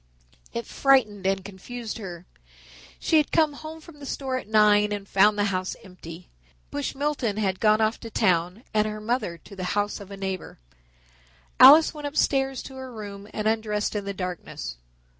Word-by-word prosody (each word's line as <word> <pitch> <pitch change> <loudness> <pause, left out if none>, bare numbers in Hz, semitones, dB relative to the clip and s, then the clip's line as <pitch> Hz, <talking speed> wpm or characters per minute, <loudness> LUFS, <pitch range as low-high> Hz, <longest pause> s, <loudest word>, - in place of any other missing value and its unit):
It 235 - -4
frightened 220 -8 +2
and 195 -1 0
confused 225 +4 -7
her. 180 -4 -8 0.7
She 320 - +3
had 300 - +2
come 310 -3 +3
home 315 +2 -9
from 310 -2 -15
the 280 - -8
store 265 -1 -3
at 255 - -7
nine 210 -1 +4
and 200 -1 -4
found 205 +2 +4
the 205 - +2
house 185 0 -2
empty. 180 -2 -11 0.4
Bush 145 - -3
Milton 275 -7 -1
had 190 -3 0
gone 215 0 +4
off 220 +1 +1
to 230 - -8
town 180 0 +1
and 215 0 +2
her 215 0 -5
mother 215 -5 -2
to 200 - -14
the 185 - -5
house 205 0 0
of 200 -1 -11
a 200 - -8
neighbor. 190 -2 -5 1.0
Alice 290 +7 +9
went 295 -2 -5
upstairs 270 -2 0
to 265 - -10
her 260 -1 -7
room 205 -3 -8
and 215 0 -2
undressed 215 -1 0
in 205 -1 -2
the 200 - -2
darkness. 180 - -5
215 Hz, 180 wpm, -25 LUFS, 195-260 Hz, 1.0 s, Alice